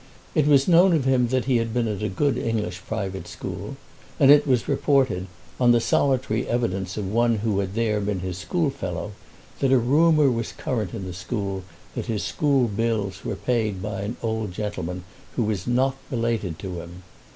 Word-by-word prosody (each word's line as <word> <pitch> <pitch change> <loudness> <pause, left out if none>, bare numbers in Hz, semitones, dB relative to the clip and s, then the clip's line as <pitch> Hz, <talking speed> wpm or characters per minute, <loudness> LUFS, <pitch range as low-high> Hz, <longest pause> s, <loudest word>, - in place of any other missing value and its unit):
It 150 -2 +2
was 140 -2 +5
known 180 +1 +6
of 150 -5 +1
him 130 -2 +3
that 130 +1 0
he 130 -2 +3
had 115 0 -2
been 120 -2 +1
at 105 -2 -3
a 105 - -1
good 140 +8 +1
English 105 -6 -2
private 95 -5 -4
school, - - -6 0.4
and 140 0 +7
it 145 0 +6
was 125 -3 +2
reported, 135 -9 +2 0.3
on 120 -1 +5
the 120 - +4
solitary 130 -2 +1
evidence 95 -6 -1
of 105 -3 -2
one 115 +3 +2
who 105 -2 0
had 100 0 -3
there 110 -2 +1
been 100 -2 -2
his 90 0 -4
schoolfellow, 145 - -2 0.5
that 135 - +2
a 135 - +6
rumour 150 +3 +4
was 115 -1 -3
current 110 -7 -3
in 100 -4 -5
the 90 - -6
school 100 0 -3 0.3
that - - -4
his 110 -3 -1
school 140 -5 +2
bills 105 -3 -2
were - - -3
paid 110 -6 -1
by 100 0 -4
an 105 +4 -4
old 110 -4 -2
gentleman 90 -3 -4 0.3
who 120 - +1
was 105 -4 -2
not 130 +2 +2
related 115 -8 -1
to 90 -3 -5
him. 85 +2 -11
115 Hz, 190 wpm, -24 LUFS, 100-130 Hz, 0.5 s, and